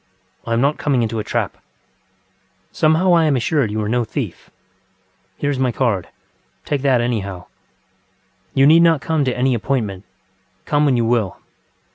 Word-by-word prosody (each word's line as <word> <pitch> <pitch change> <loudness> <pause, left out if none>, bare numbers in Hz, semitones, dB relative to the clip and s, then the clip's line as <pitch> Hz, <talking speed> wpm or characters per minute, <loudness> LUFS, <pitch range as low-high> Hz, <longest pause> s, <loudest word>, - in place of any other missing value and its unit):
I 115 - -1
am 115 - +1
not 140 +3 +1
coming 135 -5 +1
into 115 0 -2
a - - -2
trap. - - -2
ŌĆØ - - -40 0.2
ŌĆ£Somehow 180 +1 +3
I 165 -1 +4
am 150 -3 +2
assured 130 0 0
you 105 +1 -2
are - - -3
no 120 +2 +1
thief. 110 - -6 0.9
Here 145 - -1
is 135 - -3
my 130 -2 +1
card. 110 -8 -1 0.6
Take 145 -2 -1
that, 130 -3 +2
anyhow. 100 -7 -3 1.1
You 135 - +5
need 160 +3 +6
not 165 -3 +4
come 155 +2 0
to 125 -1 -1
any 130 +1 +2
appointment. 110 -5 -2 0.6
Come 150 0 +1
when 135 -4 +2
you 115 - +1
will. 115 -5 0
125 Hz, 170 wpm, -19 LUFS, 115-145 Hz, 1.1 s, need